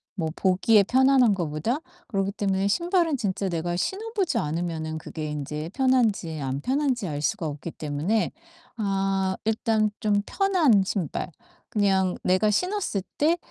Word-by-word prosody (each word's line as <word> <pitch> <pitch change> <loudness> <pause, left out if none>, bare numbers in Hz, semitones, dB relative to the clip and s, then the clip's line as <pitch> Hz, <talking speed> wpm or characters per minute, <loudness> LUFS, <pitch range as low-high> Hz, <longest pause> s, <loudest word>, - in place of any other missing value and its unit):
뭐 160 -5 -2
보기에 200 +3 +4
편안한 260 0 +4
거보다. 170 - -1 0.3
그렇기 195 -2 -1
때문에 195 -1 0
신발은 340 - +1
진짜 195 -2 -1
내가 175 0 -2
신어 415 - -3
보지 345 - +1
않으면은 160 0 -3
그게 155 0 -6
인제 150 +2 -4
편한지 230 - +1
안 135 0 -3
편한지 260 - 0
알 145 -1 -3
수가 175 +1 -1
없기 150 +3 -6
때문에 155 +10 -1 0.5
아 195 -2 0
일단 220 -1 +1
좀 205 -1 +2
편한 335 - +3
신발 180 -2 -3 0.4
그냥 190 -3 +2
내가 185 +4 +3
신었을 360 - 0 0.2
때 325 +4 +3
200 Hz, 295 characters per minute, -25 LUFS, 170-250 Hz, 0.5 s, 보기에